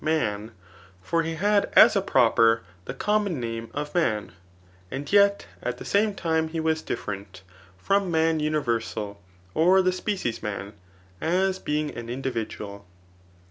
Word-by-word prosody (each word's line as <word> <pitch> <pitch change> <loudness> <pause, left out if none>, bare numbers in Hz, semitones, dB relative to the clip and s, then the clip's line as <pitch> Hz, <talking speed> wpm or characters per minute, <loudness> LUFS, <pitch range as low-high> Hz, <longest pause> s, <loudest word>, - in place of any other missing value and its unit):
man; 110 -10 0 0.5
for 165 - 0
he 165 0 -3
had 205 +4 +2
as 220 -1 +8
a 195 - +3
proper 115 -7 +3 0.2
the - - -5
common 205 -3 0
name 115 -1 -4
of 150 +1 -5
man, 110 -12 0 0.6
and 140 - -5
yet 200 0 +5 0.2
at - - -3
the - - -9
same 210 +2 +2
time 160 -3 0
he 165 +1 -4
was 160 0 0
different 95 -2 -6 0.3
[from 195 - +1
man 160 -1 +2
universal, 115 -9 -2 0.3
or 180 +4 +5
the 185 - +3
species 185 - -3
man, 100 -1 -5 0.5
as 190 +3 +1
being 150 -2 -2
an 120 0 -7
individual. 115 -5 -4
155 Hz, 140 wpm, -25 LUFS, 115-185 Hz, 0.6 s, as